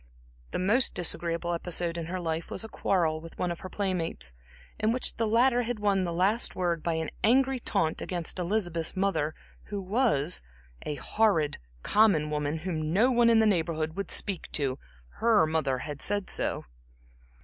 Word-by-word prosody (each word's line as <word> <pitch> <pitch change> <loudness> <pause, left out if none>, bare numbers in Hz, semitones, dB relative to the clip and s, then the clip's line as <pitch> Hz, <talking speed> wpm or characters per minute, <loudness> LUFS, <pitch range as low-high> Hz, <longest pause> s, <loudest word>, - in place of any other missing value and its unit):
The - - -3
most 210 +8 +2
disagreeable 170 0 -1
episode 170 0 0
in 165 -1 -4
her 185 +2 -3
life 165 -1 -3
was - - -2
a - - -6
quarrel 165 -7 0
with 165 0 -12
one 180 - -1
of 170 - -5
her 185 - -8
playmates, 180 - -2 0.5
in 215 +1 +2
which 250 +2 0
the 225 -1 +1
latter 240 +3 +3
had 240 0 -3
won 200 -3 +1
the 170 - -2
last 195 +7 +2
word 175 -3 0
by 170 0 -1
an 160 -1 -3
angry 265 +3 +3
taunt 165 -8 -1
against 175 0 -2
Elizabeth's 175 -3 -2
mother, 185 -6 0 0.3
who 205 -1 -4
was 190 - +1 0.5
"a 150 - -2
horrid, 165 - +1 0.2
common 195 -9 +3
woman, 150 +1 -1
whom 155 -2 -3
no 225 +9 +4
one 240 -1 +4
in 230 - +5
the 220 - +5
Neighborhood, 160 -5 0
would 200 -2 -4
speak 195 -4 -2
to 135 -3 0 0.4
her 225 -7 +4
mother 155 -4 0
had 145 +2 -6
said 205 -1 +1
so." - - -2
180 Hz, 175 wpm, -28 LUFS, 160-215 Hz, 0.5 s, in